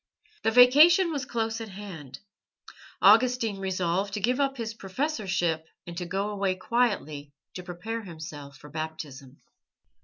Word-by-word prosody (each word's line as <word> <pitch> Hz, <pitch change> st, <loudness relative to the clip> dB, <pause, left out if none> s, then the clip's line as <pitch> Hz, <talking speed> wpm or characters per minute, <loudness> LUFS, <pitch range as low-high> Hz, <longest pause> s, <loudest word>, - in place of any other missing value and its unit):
The -, -, +2 dB
vacation 300 Hz, -, +7 dB
was 285 Hz, -4 st, -3 dB
close 225 Hz, -1 st, -2 dB
at 225 Hz, -, -7 dB
hand. 180 Hz, -10 st, -9 dB, 0.9 s
Augustine 225 Hz, -1 st, +4 dB
resolved 190 Hz, +1 st, -1 dB
to -, -, -2 dB
give 245 Hz, +6 st, 0 dB
up 275 Hz, -1 st, 0 dB
his 225 Hz, -2 st, -4 dB
professorship 190 Hz, -, -2 dB, 0.2 s
and 170 Hz, -, -8 dB
to 180 Hz, -1 st, -4 dB
go 195 Hz, +4 st, -2 dB
away 195 Hz, -2 st, -1 dB
quietly 185 Hz, -10 st, -1 dB, 0.2 s
to 180 Hz, -, -6 dB
prepare 180 Hz, +6 st, -5 dB
himself 155 Hz, -6 st, -9 dB
for 150 Hz, -, -14 dB
Baptism. 150 Hz, -4 st, -7 dB
195 Hz, 140 wpm, -27 LUFS, 170-230 Hz, 0.9 s, vacation